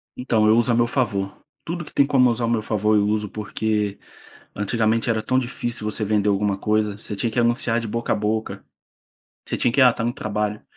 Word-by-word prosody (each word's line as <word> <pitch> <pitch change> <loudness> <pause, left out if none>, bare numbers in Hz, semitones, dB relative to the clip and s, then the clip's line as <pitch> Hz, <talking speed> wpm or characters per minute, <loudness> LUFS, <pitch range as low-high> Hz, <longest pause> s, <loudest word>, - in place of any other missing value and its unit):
Então 115 -4 +1
eu 110 +2 +5
uso 120 +1 +3
ao 115 - +2
meu 120 0 +3
favor. 100 -7 -1 0.3
Tudo 170 +1 -4
que - - -13
tem 140 - +4
como 130 -3 +4
usar 115 0 -1
ao - - -1
meu 115 -2 +1
favor 105 0 +1
eu 105 0 +3
uso, 105 -1 -1
porque 105 -1 -2 0.6
antigamente 110 +2 0
era 110 -1 0
tão 130 - +1
difícil 120 -3 -4
você 110 - -3
vender 105 0 +1
alguma 100 0 +1
coisa, 105 0 0
você 105 -1 -5
tinha 115 +3 -1
que 115 - -1
anunciar 120 0 +1
de 115 - -5
boca 115 +2 -1
a - - 0
boca, 110 +1 -2 0.8
você - - -2
tinha 120 - +1
que, 140 - +2
ah, 125 -2 +7
tá 115 - -4
no 120 - 0
trabalho, 105 -1 -3
110 Hz, 225 wpm, -22 LUFS, 105-120 Hz, 0.8 s, ah